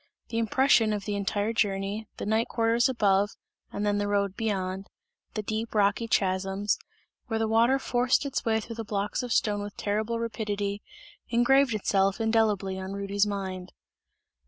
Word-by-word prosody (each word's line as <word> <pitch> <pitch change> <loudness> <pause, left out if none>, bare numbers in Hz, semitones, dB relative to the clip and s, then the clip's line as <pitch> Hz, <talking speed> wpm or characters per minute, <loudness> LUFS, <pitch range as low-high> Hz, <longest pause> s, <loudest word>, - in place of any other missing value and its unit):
The 230 - -1
impression 230 -1 +3
of 205 -2 -4
the 205 - -2
entire 205 +2 -1
journey, 205 0 -1
the - - -4
night 220 +2 +1
quarters 230 +1 +2
above 205 -4 +2 0.4
and 205 - -3
then 205 0 +1
the 205 - -1
road 200 -1 0
beyond, 195 -3 -2 0.5
the 215 - -2
deep 220 +2 -3
rocky 205 +2 +2
chasms, 195 0 0 0.5
where 225 -2 -1
the 225 0 0
water 230 +4 +4
forced 250 +1 +1
its 275 -2 -2
way 220 -1 +2
through 230 +1 -8
the 225 - -3
blocks 205 -1 -2
of 250 -1 -5
stone 205 -2 +1
with 205 0 -7
terrible 215 +3 -1
rapidity, 210 -3 -3 0.5
engraved 245 +1 +4
itself 195 0 +1
indelibly 215 -4 +1
on 190 +1 -5
Rudy's 200 +1 0
mind. 190 -2 -5
210 Hz, 160 wpm, -27 LUFS, 200-225 Hz, 0.5 s, water